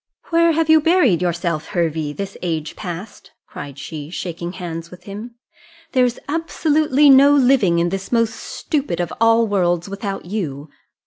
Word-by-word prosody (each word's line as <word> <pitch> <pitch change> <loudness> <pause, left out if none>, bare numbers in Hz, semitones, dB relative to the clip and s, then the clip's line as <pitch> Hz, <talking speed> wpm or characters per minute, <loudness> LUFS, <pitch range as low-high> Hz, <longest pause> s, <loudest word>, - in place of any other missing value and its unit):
"Where 335 0 +4
have 325 0 +1
you 315 0 +6
buried 295 - +3
yourself, 170 -3 -1
Hervey, 160 -3 -1
this 195 +5 -6
age 160 -4 -3
past?" 185 +2 -8
cried 140 -1 -9
she, 150 +1 -7
shaking 175 0 -5
hands 170 -2 -6
with 180 0 -14
him: 210 +5 -8 0.6
"there's 250 -2 +2
absolutely 300 -2 +2
no 280 +1 +7
living 250 -10 +4
in 170 +1 +1
this 195 +1 -5
most 230 -2 +2
stupid 275 - -3
of 175 -2 -2
all 230 0 +5
worlds 175 -4 0
without 200 -1 -5
you. 160 -7 -5
195 Hz, 150 wpm, -20 LUFS, 170-265 Hz, 0.6 s, no